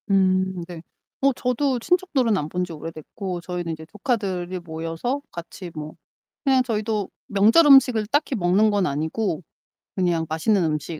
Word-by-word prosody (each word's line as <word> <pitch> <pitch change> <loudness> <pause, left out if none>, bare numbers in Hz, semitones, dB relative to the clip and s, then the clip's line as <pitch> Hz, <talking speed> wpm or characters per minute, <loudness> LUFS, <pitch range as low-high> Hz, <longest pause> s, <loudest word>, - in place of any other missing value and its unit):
음 185 -2 +2
네. 175 -3 -8 0.4
어 275 0 +4
저도 250 +2 0
친척들은 275 - +1
안 150 -5 -2
본지 180 0 -3
오래됐고, 165 +4 -6
저희는 175 -2 -4
이제 160 0 -9
조카들이 190 - -2
모여서 165 - -4
같이 175 +1 -8
뭐 155 0 -6 0.5
그냥 265 -3 +4
저희도 215 -3 -2 0.2
명절 220 +11 +5
음식을 250 -6 +6
딱히 290 +4 +1
먹는 200 +2 +3
건 200 -3 +1
아니고, 160 +5 -2 0.5
그냥 175 -3 +1
맛있는 180 +5 +2
음식 155 0 -2
190 Hz, 305 characters per minute, -23 LUFS, 165-230 Hz, 0.5 s, 음식을